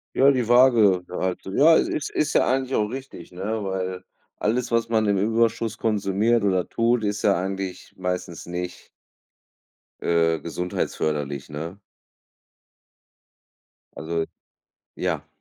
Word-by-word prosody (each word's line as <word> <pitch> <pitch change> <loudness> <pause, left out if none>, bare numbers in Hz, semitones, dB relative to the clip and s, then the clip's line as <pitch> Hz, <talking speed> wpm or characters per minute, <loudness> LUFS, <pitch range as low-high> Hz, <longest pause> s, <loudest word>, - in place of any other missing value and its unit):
Ja, 135 - +6
die 125 -5 +1
Waage 115 -7 +5
halt. 90 0 -2
Ja, 145 +12 +5
ist 150 - 0
ist 155 - 0
ja - - +4
eigentlich 130 0 0
auch 105 - +2
richtig, 130 -6 -8
ne, 105 +4 -3
weil 95 -1 -3 0.3
alles, 120 +4 0
was 115 0 +2
man 110 -2 +1
im 100 -1 +2
Überschuss 115 +2 +1
konsumiert 105 +1 +1
oder 95 -3 +1
tut, 115 0 +1
ist 105 0 -2
ja 100 - +4
eigentlich 95 0 -4
meistens 90 -2 -4
nicht 90 +1 -6 1.1
äh, 80 -2 +2
gesundheitsförderlich, 75 -4 -3
ne? 80 +5 -6 2.2
Also, 80 +1 -2 0.7
ja. - - -2
100 Hz, 120 wpm, -24 LUFS, 90-115 Hz, 2.2 s, Ja